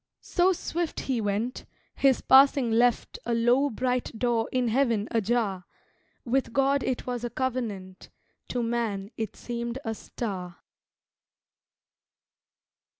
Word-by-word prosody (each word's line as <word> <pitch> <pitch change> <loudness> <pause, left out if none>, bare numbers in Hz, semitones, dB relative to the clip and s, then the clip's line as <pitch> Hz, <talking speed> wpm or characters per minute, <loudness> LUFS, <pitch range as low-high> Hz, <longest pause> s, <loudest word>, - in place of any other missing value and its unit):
So 360 +1 +3
swift 340 -2 -3
He 255 -4 -1
went, 215 +5 -2 0.3
His 270 -2 +3
passing 270 -2 +5
left 240 +1 +2
A 235 - 0
low, 245 +5 +3
bright 250 -1 -2
door 235 -1 0
in 255 -1 +1
Heaven 230 -3 +1
ajar 215 -4 0 0.6
With 255 -1 0
God 275 +1 +3
it 255 -1 -2
was 245 -1 -3
a 240 - -2
covenant, 225 -8 -4 0.4
To 245 -1 -2
man 225 -4 -2
it 220 -3 -4
seemed 235 0 -4
a 225 - -1
star. 185 -6 -6
240 Hz, 120 wpm, -27 LUFS, 225-260 Hz, 0.6 s, passing